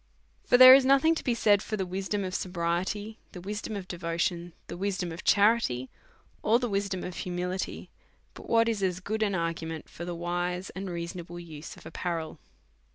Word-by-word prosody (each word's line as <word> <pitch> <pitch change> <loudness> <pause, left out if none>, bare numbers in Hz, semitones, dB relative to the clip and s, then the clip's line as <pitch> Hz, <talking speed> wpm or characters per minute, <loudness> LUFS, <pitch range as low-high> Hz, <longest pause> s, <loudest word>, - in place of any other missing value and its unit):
For 245 - +4
there 255 +1 +12
is 270 0 +7
nothing 275 +5 +5
to 325 - -4
be 245 - +1
said 205 -3 +4
for 215 - -4
the 190 - -1
wisdom 195 +2 -2
of 185 -1 -4
sobriety, 185 +5 -2
the 180 - -7
wisdom 210 +3 -5
of 195 -2 -6
devotion, 170 0 -2
the - - -7
wisdom 185 -2 -2
of 165 +4 -8
cha 200 - +4
rity, 130 - -3 0.5
or 220 +3 +4
the 245 0 -2
wisdom 200 -3 -2
of 180 - -6
humility, 180 +1 -4 0.4
but - - -12
what 230 0 +4
is 220 -3 -1
as 185 -2 0
good 215 +4 -3
an 205 -3 +1
argument 165 -2 -3
for 170 - -9
the 175 0 -4
wise 175 +2 -3
and 190 0 -6
reasonable 170 0 -6
use 160 -3 -9
of - - -16
apparel. 165 -3 -4
185 Hz, 190 wpm, -28 LUFS, 170-210 Hz, 0.5 s, there